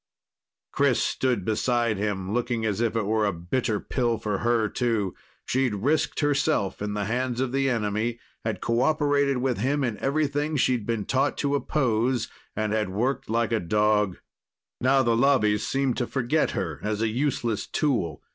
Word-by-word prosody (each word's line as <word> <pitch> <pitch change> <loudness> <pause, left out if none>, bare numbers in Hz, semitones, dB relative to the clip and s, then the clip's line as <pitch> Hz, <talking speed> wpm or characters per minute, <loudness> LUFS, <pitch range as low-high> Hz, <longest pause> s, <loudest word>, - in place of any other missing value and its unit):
Chris - - +2
stood 130 -2 0
beside 115 +1 +1
him, 100 -1 -2
looking 120 -1 -1
as 105 0 -1
if 115 -1 0
it 110 -3 0
were 110 +1 +1
a 100 - +2
bitter 105 +6 -1
pill 120 -3 -1
for 105 -2 -2
her, 120 -2 +2
too. 110 -5 -1 0.3
She'd 130 -4 +1
risked 145 +12 0
herself 145 -9 +1
in 105 0 -2
the 105 -1 -1
hands 125 +2 -1
of 130 -1 0
the 135 0 +1
enemy, 115 0 -1 0.3
had 110 -4 -3
cooperated 140 +2 +2
with 125 -3 -1
him 140 +5 +1
in 115 -5 -2
everything 145 +1 0
she'd 125 -5 +1
been 115 -3 -1
taught 135 +2 +1
to 140 -1 0
oppose, 125 -4 0 0.3
and 110 -1 -1
had 110 -2 0
worked 120 +8 -1
like 115 0 +1
a 115 - +2
dog. 105 +1 +1 0.6
Now 135 +1 +3
the 115 -1 +2
Lobbies 115 -5 +3
seemed 135 -2 0
to 120 - -1
forget 135 +4 +1
her 80 -5 -3
as 105 +1 -1
a - - +2
useless 120 -2 -1
tool. 115 - -1
120 Hz, 170 wpm, -26 LUFS, 105-135 Hz, 0.6 s, Now